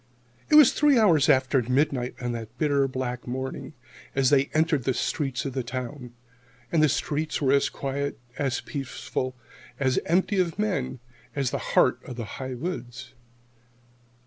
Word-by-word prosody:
It -, -, +5 dB
was 280 Hz, -3 st, +8 dB
three 290 Hz, -3 st, +4 dB
hours 165 Hz, -, +4 dB
after 130 Hz, -1 st, +4 dB
midnight 125 Hz, 0 st, 0 dB
on 120 Hz, -1 st, -2 dB
that 115 Hz, 0 st, -7 dB
bitter 140 Hz, -2 st, +2 dB
black 130 Hz, -2 st, -4 dB
morning 130 Hz, +4 st, -5 dB, 0.4 s
as 135 Hz, 0 st, +3 dB
they 140 Hz, -1 st, +5 dB
entered 155 Hz, -2 st, +1 dB
the 130 Hz, 0 st, 0 dB
streets 135 Hz, -4 st, -2 dB
of 135 Hz, -, -3 dB
the 130 Hz, -, -1 dB
town. 125 Hz, 0 st, -6 dB, 0.6 s
And 165 Hz, -, +3 dB
the 155 Hz, -, +5 dB
streets 155 Hz, +2 st, -1 dB
were 135 Hz, -3 st, +2 dB
as 140 Hz, -, +3 dB
quiet, 140 Hz, +1 st, -3 dB, 0.2 s
as 135 Hz, -3 st, -1 dB
peaceful, 130 Hz, -2 st, -4 dB, 0.4 s
as 130 Hz, -2 st, +2 dB
empty 190 Hz, +4 st, +2 dB
of 175 Hz, -3 st, 0 dB
men, 145 Hz, -, -2 dB, 0.3 s
as 135 Hz, -3 st, 0 dB
the -, -, -2 dB, 0.2 s
heart -, -, +4 dB
of 125 Hz, -, -8 dB
the 115 Hz, -2 st, -5 dB, 0.2 s
high 130 Hz, -1 st, -4 dB
woods. 125 Hz, -5 st, -6 dB
135 Hz, 160 wpm, -26 LUFS, 125-155 Hz, 0.6 s, was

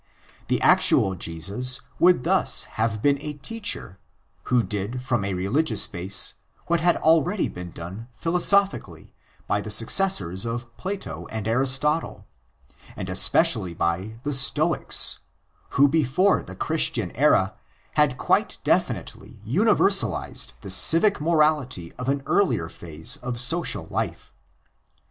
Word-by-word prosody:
The -, -, 0 dB
actual 95 Hz, -, +4 dB
Jesus 100 Hz, +10 st, 0 dB, 0.2 s
would 175 Hz, -7 st, +4 dB
thus -, -, +1 dB
have 110 Hz, -1 st, -3 dB
been 140 Hz, -1 st, +2 dB
a 150 Hz, 0 st, -6 dB
teacher 150 Hz, -, -5 dB, 0.5 s
who 125 Hz, -2 st, +1 dB
did 105 Hz, +4 st, -4 dB
from 120 Hz, -5 st, -1 dB
a 100 Hz, -1 st, -3 dB
religious 110 Hz, -, +1 dB
base 95 Hz, +3 st, -1 dB, 0.3 s
what 170 Hz, 0 st, 0 dB
had 175 Hz, +1 st, +2 dB
already 165 Hz, +5 st, +2 dB
been 90 Hz, 0 st, -8 dB
done 90 Hz, +8 st, -9 dB
philosophically 180 Hz, -, 0 dB, 0.3 s
by -, -, -1 dB
the -, -, -8 dB
successors 95 Hz, -, +1 dB
of 120 Hz, 0 st, -6 dB
Plato 195 Hz, +1 st, -6 dB
and 110 Hz, -1 st, -5 dB
Aristotle, 135 Hz, +6 st, 0 dB, 0.7 s
and 95 Hz, -, -6 dB
especially 95 Hz, -, +2 dB
by 95 Hz, +8 st, -3 dB
the 145 Hz, -, -2 dB
Stoics, 150 Hz, +5 st, +3 dB, 0.6 s
who 140 Hz, +1 st, +6 dB
before 160 Hz, +6 st, +1 dB
the 95 Hz, -, -11 dB
Christian 120 Hz, -, -1 dB
era 110 Hz, -8 st, +2 dB, 0.4 s
had 150 Hz, -4 st, +1 dB
quite -, -, 0 dB
definitely -, -, -2 dB
universalised 170 Hz, -, +1 dB
the 95 Hz, -, -7 dB
civic 165 Hz, -, +4 dB
morality 150 Hz, -, 0 dB
of 125 Hz, +1 st, -4 dB
an 140 Hz, 0 st, -1 dB
earlier 90 Hz, -, 0 dB
phase 85 Hz, -, -2 dB
of 125 Hz, -3 st, -5 dB
social 165 Hz, +8 st, +3 dB
xii -, -, -17 dB
PREFACE -, -, -18 dB
life. -, -, -4 dB
125 Hz, 130 wpm, -23 LUFS, 100-160 Hz, 0.7 s, who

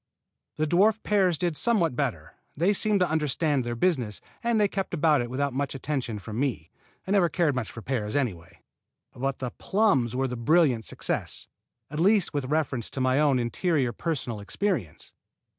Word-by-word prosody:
The 155 Hz, -, 0 dB
dwarf 200 Hz, +7 st, +3 dB
pears 190 Hz, -5 st, +2 dB
did 175 Hz, -1 st, -1 dB
somewhat 180 Hz, -, +1 dB
better. -, -, -3 dB, 0.2 s
They 180 Hz, +7 st, +3 dB
seemed 205 Hz, -1 st, +2 dB
to 180 Hz, -, +4 dB
understand 150 Hz, -2 st, 0 dB
their 120 Hz, 0 st, -3 dB
business, 125 Hz, -, 0 dB, 0.2 s
and 235 Hz, -2 st, +2 dB
they 205 Hz, -, +4 dB
kept 195 Hz, -2 st, -3 dB
about 150 Hz, -3 st, +3 dB
it 120 Hz, -, -4 dB
without 140 Hz, +2 st, -1 dB
much 140 Hz, +1 st, -2 dB
attention 135 Hz, -5 st, -3 dB
from 105 Hz, +3 st, -6 dB
me. 120 Hz, -, -2 dB, 0.3 s
I 190 Hz, -, -4 dB
never 190 Hz, -4 st, +4 dB
cared 165 Hz, -5 st, +1 dB
much 130 Hz, -4 st, -3 dB
for 115 Hz, -, -9 dB
pears, 110 Hz, -5 st, -2 dB
anyway. 100 Hz, -13 st, -3 dB, 0.5 s
But 135 Hz, +2 st, -2 dB
the 125 Hz, -2 st, -4 dB
plums 190 Hz, -, +2 dB
were 135 Hz, +1 st, +1 dB
the 125 Hz, -, -4 dB
brilliant 130 Hz, -2 st, +3 dB
success, -, -, -3 dB, 0.4 s
at 150 Hz, -, -4 dB
least 195 Hz, 0 st, +3 dB
with 145 Hz, -3 st, -1 dB
reference 135 Hz, -5 st, -1 dB
to -, -, -5 dB
my 130 Hz, +1 st, +2 dB
own 145 Hz, -3 st, +3 dB
interior 125 Hz, +2 st, 0 dB
personal 125 Hz, -5 st, -3 dB
experience. 105 Hz, -, -3 dB
145 Hz, 175 wpm, -27 LUFS, 125-175 Hz, 0.5 s, to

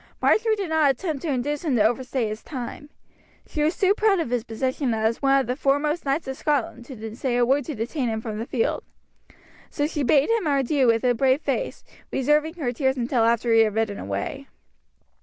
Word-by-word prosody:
Marjory 440 Hz, 0 st, +3 dB
did 395 Hz, -5 st, -4 dB
not 315 Hz, -2 st, +3 dB
attempt 290 Hz, +1 st, -2 dB
to -, -, -4 dB
induce 285 Hz, +3 st, -1 dB
him 295 Hz, -6 st, 0 dB
to 215 Hz, -, +4 dB
overstay 245 Hz, +1 st, 0 dB
his 215 Hz, +1 st, -5 dB
time. 275 Hz, +2 st, -7 dB, 0.6 s
She 300 Hz, -, -4 dB
was 310 Hz, +3 st, +1 dB
too 390 Hz, 0 st, +4 dB
proud 420 Hz, -3 st, +2 dB
of 285 Hz, -8 st, -2 dB
his 245 Hz, -2 st, 0 dB
position 255 Hz, +2 st, -2 dB
as 220 Hz, +1 st, 0 dB
one 275 Hz, 0 st, +4 dB
of -, -, -4 dB
the 250 Hz, -, -2 dB
foremost 295 Hz, +4 st, 0 dB
knights 275 Hz, +3 st, -1 dB
of 265 Hz, -, -3 dB
Scotland 275 Hz, -5 st, -1 dB
to 225 Hz, -4 st, -8 dB
say 245 Hz, -1 st, -1 dB
a 245 Hz, -, +4 dB
word 275 Hz, +3 st, +2 dB
to 305 Hz, -, -5 dB
detain 240 Hz, +3 st, -2 dB
him 220 Hz, 0 st, -2 dB
from 220 Hz, -1 st, -5 dB
the 230 Hz, -, -4 dB
field. 235 Hz, -4 st, -1 dB, 0.9 s
So 290 Hz, -, -1 dB
she 300 Hz, -1 st, -2 dB
bade 280 Hz, -, +3 dB
him 450 Hz, -7 st, +1 dB
adieu 275 Hz, -1 st, +2 dB
with 230 Hz, 0 st, +3 dB
a 250 Hz, -1 st, +3 dB
brave 265 Hz, +4 st, +2 dB
face, -, -, -3 dB, 0.3 s
reserving 300 Hz, +5 st, +1 dB
her 285 Hz, -8 st, -2 dB
tears 265 Hz, +1 st, 0 dB
until 240 Hz, -1 st, +1 dB
after 230 Hz, 0 st, +2 dB
he 225 Hz, -, +6 dB
had 215 Hz, -2 st, +3 dB
ridden 220 Hz, -2 st, -1 dB
away. 100 Hz, 0 st, -4 dB
265 Hz, 215 wpm, -24 LUFS, 235-300 Hz, 0.9 s, he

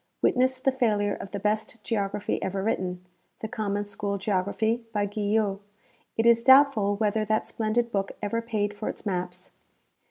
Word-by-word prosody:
Witness 260 Hz, +1 st, +3 dB
the 270 Hz, +1 st, +2 dB
failure 210 Hz, -6 st, +1 dB
of 195 Hz, -, -7 dB
the 200 Hz, -, -4 dB
best 215 Hz, +2 st, -2 dB
geography 205 Hz, -2 st, -2 dB
ever 195 Hz, 0 st, -2 dB
written, 180 Hz, -4 st, -2 dB, 0.4 s
the 220 Hz, -, -3 dB
Com 215 Hz, -3 st, -2 dB
mon 205 Hz, 0 st, -1 dB
School 200 Hz, 0 st, -3 dB
Geography 205 Hz, +4 st, 0 dB
by 205 Hz, -2 st, 0 dB
Guyot. 205 Hz, -1 st, 0 dB, 0.6 s
It 225 Hz, -, +2 dB
is 235 Hz, 0 st, +5 dB
doubtful 260 Hz, -7 st, +6 dB
wdiether 215 Hz, 0 st, 0 dB
that 215 Hz, 0 st, +1 dB
splendid 230 Hz, +2 st, -1 dB
book 195 Hz, -2 st, -1 dB
ever 230 Hz, +2 st, -1 dB
paid 215 Hz, -3 st, -1 dB
for 210 Hz, +1 st, -4 dB
its -, -, -7 dB
maps. 180 Hz, -1 st, -4 dB
210 Hz, 165 wpm, -27 LUFS, 200-225 Hz, 0.6 s, doubtful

